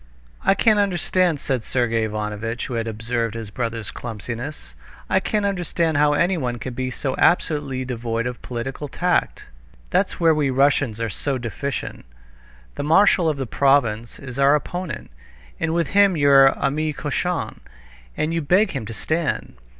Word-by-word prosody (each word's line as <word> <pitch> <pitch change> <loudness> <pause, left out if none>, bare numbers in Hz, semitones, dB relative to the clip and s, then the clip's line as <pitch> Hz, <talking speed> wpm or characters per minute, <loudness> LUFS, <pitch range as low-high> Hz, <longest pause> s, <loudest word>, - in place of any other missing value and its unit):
"I 195 - +4
can't 215 +1 +4
understand," 180 -4 +1
said 130 -4 -2
Sergey 115 -2 0
Ivanovitch, 110 +2 -3
who 130 - -6
had 115 -1 -2
observed 115 +1 -2
his 110 -3 -6
brother's 115 -3 -3
clumsiness, 110 - -6 0.4
"I 190 - +4
can't 210 +2 -1
understand 170 -5 0
how 145 0 +4
anyone 145 -7 0
can 125 +2 -6
be 130 +1 -3
so 130 +1 -3
absolutely 145 -6 +1
devoid 115 -2 -3
of 125 0 -5
political 130 +4 -5
tact. 180 +5 0 0.5
That's - - +1
where 165 -2 +5
we 150 -3 +1
Russians 135 -3 +2
are 115 -2 -2
so 135 +8 -2
deficient. 125 - -5 0.7
The - - -4
marshal 170 +2 +4
of 150 - -1
the 135 - -2
province 120 -4 +1
is 130 -1 -8
our 140 +1 +5
opponent, 165 - -4 0.5
and 165 - 0
with 170 -2 0
him 200 -3 +4
you're 140 -2 +6
ami 155 +2 0
cochon, 165 +5 -2 0.6
and 155 +2 0
you 165 - 0
beg 185 +7 +3
him 130 -7 -4
to 115 - -7
stand. 160 +4 -2
135 Hz, 160 wpm, -22 LUFS, 115-165 Hz, 0.7 s, you're